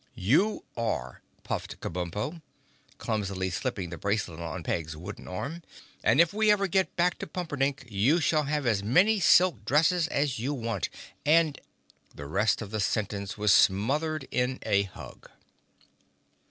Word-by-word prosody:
"You 150 - +2
are," 65 - -3 0.2
puffed - - -5
Kabumpo, 90 - -4 0.6
clumsily 100 -4 -2
slipping 90 0 -3
the 85 - -7
bracelet 100 -5 -2
on 85 +1 -5
Peg's 80 -2 -3
wooden 90 +5 -9
arm, 140 - -5 0.4
"and - - +3
if 170 +1 +5
we 215 0 +2
ever 205 -1 +4
get 190 0 0
back 175 +1 +1
to - - -5
Pumperdink 145 -6 -2
you 120 - +2
shall 155 -1 +2
have 145 -1 -1
as 110 -5 +2
many 180 - +3
silk 170 - +4
dresses 160 - +3
as 140 -6 -1
you 135 +5 -2
want 115 -3 -2 0.3
and—" 155 -1 +3 0.5
The 70 - -8
rest 105 +10 +1
of 105 - -9
the 110 - -2
sentence 100 0 -2
was 105 -1 +4
smothered 140 +10 +2
in 125 +1 0
a 100 0 +2
hug. - - -12
120 Hz, 150 wpm, -28 LUFS, 100-160 Hz, 0.6 s, if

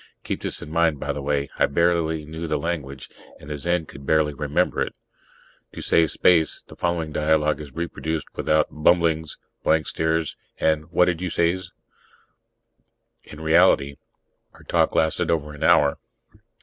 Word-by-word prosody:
Keep - - -4
this - - 0
in 75 - -10
mind, 80 -3 +2
by - - -2
the 70 - -5
way: 70 0 -1
I - - +4
barely 80 0 +1
knew 80 +2 -6
the 75 - 0
language, 70 -4 -4 0.3
and 70 - -10
the 75 - -3
Zen 85 +2 0
could 70 - -12
barely 75 +1 +2
remember 75 0 0
it. - - -2 0.8
To - - -7
save 80 -1 +3
space, 85 -3 +2
the - - -14
following 85 -3 -2
dialogue 75 0 +1
is 70 -2 -11
reproduced 80 -2 -3
without 75 0 +1
bumblings, 80 0 +1 0.3
blank 80 0 +2
stares 80 -1 -1 0.2
and 80 -1 +1
What 90 +1 +4
did 90 -1 -1
you 90 - -2
says? 85 +3 0 1.6
In 75 - -11
reality, 70 -3 +3 0.6
our - - -17
talk - - +1
lasted 80 -1 +1
over 75 -2 -1
an 75 - -12
hour. 70 -1 +4
80 Hz, 160 wpm, -23 LUFS, 75-85 Hz, 1.6 s, I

